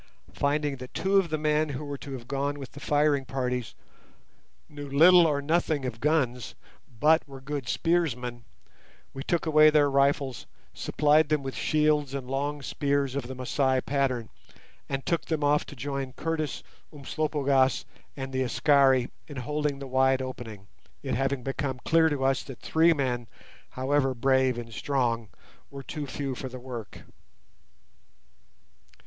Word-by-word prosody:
Finding 145 Hz, 0 st, 0 dB
that 125 Hz, 0 st, -10 dB
two 195 Hz, +1 st, +2 dB
of 190 Hz, -3 st, +2 dB
the 155 Hz, -, -1 dB
men 150 Hz, 0 st, +1 dB
who 145 Hz, +2 st, -5 dB
were 145 Hz, -1 st, -5 dB
to 140 Hz, -, -8 dB
have 120 Hz, -2 st, -8 dB
gone 140 Hz, +1 st, -2 dB
with 135 Hz, -2 st, -8 dB
the 145 Hz, -, -11 dB
firing 145 Hz, -1 st, +2 dB
parties 125 Hz, -3 st, -3 dB, 0.9 s
knew 145 Hz, -1 st, -9 dB
little 170 Hz, +5 st, +7 dB
or 145 Hz, -2 st, 0 dB
nothing 155 Hz, -2 st, +1 dB
of 115 Hz, -3 st, -4 dB
guns, 130 Hz, -4 st, 0 dB, 0.4 s
but 160 Hz, +1 st, +4 dB
were 135 Hz, -1 st, -10 dB
good 140 Hz, -1 st, -5 dB
spearsmen, 125 Hz, -9 st, 0 dB, 0.7 s
we 135 Hz, -, -6 dB
took 170 Hz, +4 st, -1 dB
away 155 Hz, -1 st, +6 dB
their 150 Hz, -2 st, +3 dB
rifles, 140 Hz, -3 st, +1 dB, 0.3 s
supplied 150 Hz, 0 st, +2 dB
them 150 Hz, -2 st, +1 dB
with 135 Hz, -1 st, -4 dB
shields 150 Hz, -3 st, +1 dB
and 135 Hz, -2 st, -5 dB
long 140 Hz, +2 st, -2 dB
spears 140 Hz, -1 st, 0 dB
of 140 Hz, -4 st, -3 dB
the 130 Hz, -, -6 dB
Masai 130 Hz, +1 st, +1 dB
pattern, 130 Hz, -4 st, -1 dB, 0.6 s
and 135 Hz, -1 st, -3 dB
took 170 Hz, -, 0 dB
them 155 Hz, -2 st, -2 dB
off 145 Hz, +1 st, +2 dB
to -, -, -10 dB
join 135 Hz, 0 st, -4 dB
Curtis, 155 Hz, -1 st, -3 dB, 0.3 s
Umslopogaas, 140 Hz, -2 st, 0 dB, 0.3 s
and 135 Hz, -1 st, -5 dB
the 130 Hz, -, 0 dB
Askari 130 Hz, 0 st, +3 dB, 0.2 s
in 145 Hz, -, -9 dB
holding 150 Hz, +3 st, -2 dB
the 140 Hz, -, -7 dB
wide 130 Hz, 0 st, +2 dB
opening; 120 Hz, -6 st, -7 dB, 0.4 s
it -, -, -2 dB
having 135 Hz, +1 st, -1 dB
become 135 Hz, -1 st, -3 dB
clear 160 Hz, 0 st, +4 dB
to 145 Hz, -3 st, -2 dB
us 135 Hz, 0 st, +2 dB
that 135 Hz, -4 st, -9 dB
three 165 Hz, +1 st, +4 dB
men, 125 Hz, -6 st, -1 dB, 0.4 s
however 135 Hz, 0 st, 0 dB
brave 130 Hz, 0 st, +2 dB
and 115 Hz, -1 st, -7 dB
strong, 115 Hz, -6 st, -1 dB, 0.4 s
were 140 Hz, -1 st, -9 dB
too 150 Hz, 0 st, -5 dB
few 135 Hz, +1 st, -4 dB
for 130 Hz, +1 st, -6 dB
the 130 Hz, -, -8 dB
work. 120 Hz, -6 st, -8 dB
140 Hz, 155 wpm, -27 LUFS, 130-150 Hz, 0.9 s, little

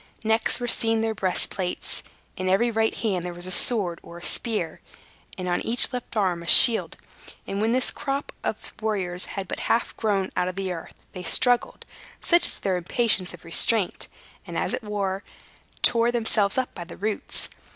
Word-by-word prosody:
Next 220 Hz, +2 st, +1 dB
were 245 Hz, -, -4 dB
seen 225 Hz, -1 st, +1 dB
their 225 Hz, 0 st, -1 dB
bright 190 Hz, -3 st, -2 dB
breastplates; 185 Hz, -2 st, -2 dB, 0.3 s
in 185 Hz, 0 st, -3 dB
every 235 Hz, +6 st, +2 dB
right 220 Hz, 0 st, 0 dB
hand 195 Hz, -6 st, -2 dB
there 175 Hz, -1 st, -6 dB
was 175 Hz, +1 st, -2 dB
a 185 Hz, -, -2 dB
sword 185 Hz, -6 st, +3 dB
or 170 Hz, -, -13 dB
a 175 Hz, -, -12 dB
spear, 215 Hz, -7 st, -2 dB, 0.6 s
and 185 Hz, -1 st, -5 dB
on 175 Hz, -, -1 dB
each 240 Hz, +3 st, +3 dB
left 245 Hz, -2 st, -6 dB
arm 185 Hz, -4 st, 0 dB
a 170 Hz, -, -11 dB
shield; 230 Hz, +4 st, +8 dB, 0.5 s
and 200 Hz, +1 st, -4 dB
when 220 Hz, +1 st, +1 dB
this 255 Hz, +2 st, +1 dB
strange -, -, -3 dB
crop 275 Hz, +1 st, -3 dB
of -, -, -2 dB, 0.2 s
warriors 185 Hz, -5 st, -3 dB
had 195 Hz, -2 st, -7 dB
but -, -, -6 dB
half 230 Hz, -, 0 dB
grown 200 Hz, -4 st, -1 dB
out 180 Hz, 0 st, -1 dB
of 185 Hz, -, -5 dB
the 195 Hz, -1 st, -4 dB
earth, 165 Hz, -2 st, -8 dB, 0.2 s
they 185 Hz, -, -9 dB
struggled 245 Hz, +7 st, +2 dB, 0.3 s
such 345 Hz, 0 st, +3 dB
was -, -, 0 dB
their 190 Hz, -2 st, -1 dB
impatience 185 Hz, +1 st, -1 dB
of 170 Hz, -, -20 dB
restraint 190 Hz, +4 st, +1 dB, 0.4 s
and, -, -, -6 dB
as -, -, -2 dB
it -, -, -3 dB
were, 200 Hz, -2 st, -3 dB, 0.6 s
tore 235 Hz, 0 st, +3 dB
themselves 220 Hz, -3 st, +1 dB
up 255 Hz, -1 st, -2 dB
by 175 Hz, -, -8 dB
the 170 Hz, -, -12 dB
roots. 210 Hz, +1 st, -3 dB
205 Hz, 195 wpm, -24 LUFS, 180-230 Hz, 0.6 s, shield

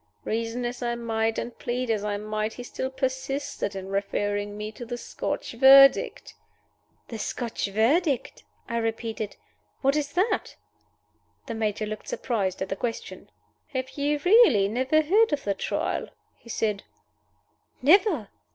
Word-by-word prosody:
Reason 230 Hz, +2 st, -2 dB
as 245 Hz, +1 st, -4 dB
I 240 Hz, -1 st, -1 dB
might, 225 Hz, -1 st, -1 dB
and 240 Hz, -, -4 dB
plead 245 Hz, 0 st, -2 dB
as 210 Hz, -2 st, 0 dB
I 205 Hz, -1 st, -1 dB
might, 215 Hz, +1 st, -3 dB
he 245 Hz, -, -8 dB
still 260 Hz, +1 st, -4 dB
persisted 265 Hz, -4 st, -3 dB
in 190 Hz, 0 st, -6 dB
referring 205 Hz, +1 st, -2 dB
me 210 Hz, 0 st, -5 dB
to 230 Hz, -, -9 dB
the 240 Hz, +1 st, -5 dB
Scotch -, -, -4 dB
Verdict." 270 Hz, +2 st, +6 dB, 0.8 s
"The 225 Hz, -, -6 dB
Scotch 235 Hz, -1 st, -3 dB
Verdict?" 265 Hz, -, +1 dB, 0.2 s
I 235 Hz, -, -2 dB
repeated. 225 Hz, -2 st, -3 dB, 0.5 s
"What 275 Hz, +1 st, +3 dB
is 290 Hz, -1 st, -1 dB
that?" 385 Hz, +6 st, 0 dB, 0.9 s
The 235 Hz, -, -5 dB
Major 215 Hz, -1 st, -1 dB
looked 215 Hz, 0 st, -6 dB
surprised 195 Hz, -7 st, -1 dB
at 190 Hz, -, -7 dB
the -, -, -1 dB
question. 230 Hz, +3 st, -5 dB, 0.5 s
"Have 260 Hz, 0 st, -2 dB
you 290 Hz, +1 st, 0 dB
really 360 Hz, -, +6 dB
never 260 Hz, +8 st, +2 dB
heard 415 Hz, +7 st, +4 dB
of 290 Hz, -, -1 dB
the 200 Hz, -, 0 dB
Trial?" 195 Hz, -, -2 dB, 0.3 s
he 235 Hz, -, -18 dB
said. 210 Hz, -3 st, -1 dB, 1.0 s
"Never." 320 Hz, -, +4 dB
235 Hz, 145 wpm, -26 LUFS, 215-270 Hz, 1.0 s, Verdict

